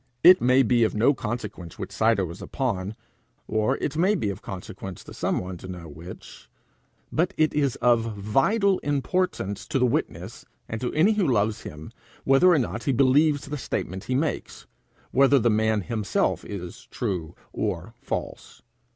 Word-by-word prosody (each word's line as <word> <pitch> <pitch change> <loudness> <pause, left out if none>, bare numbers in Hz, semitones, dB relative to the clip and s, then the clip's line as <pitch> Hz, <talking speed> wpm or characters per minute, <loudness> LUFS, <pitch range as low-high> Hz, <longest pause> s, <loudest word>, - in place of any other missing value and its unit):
It 180 +2 +9
may 130 +2 +5
be 120 0 +3
of 110 - +1
no 120 +7 +4
consequence 105 - -5
which - - -6
side 110 -1 +2
I - - +2
was 85 -1 -6
upon, 110 -6 -2 0.5
or 110 +5 +1
it 145 - -3
may 185 +6 +3
be 105 - -1
of 95 - -8
consequence 95 0 -8
to - - -11
some - - -1
one 90 0 -4
to 95 - -10
know 90 -2 -8
which, 85 +4 -11 0.6
but 175 +5 0
it 155 0 +3
is 140 -4 +1
of 115 -3 +3
vital 185 - +2
importance 145 - -1
to 155 - 0
the 125 - +3
witness 120 - -2 0.2
and 110 - -5
to 125 - -1
any 170 +8 +4
who 210 -4 +1
love 110 -3 +1
him, 75 +1 -9 0.3
whether 135 +7 +5
or 175 - +5
not 120 -3 -2
he 140 - +2
believes 140 +3 +3
the 145 0 -5
statement 95 -6 -4
he 130 - -1
makes 150 +3 -2 0.5
whether 135 +2 +5
the 120 -2 +3
man 110 0 +2
himself 105 +1 -1
is 90 -4 -8
true 85 -4 -3 0.2
or - - -3
false. - - -6
120 Hz, 175 wpm, -25 LUFS, 100-145 Hz, 0.6 s, It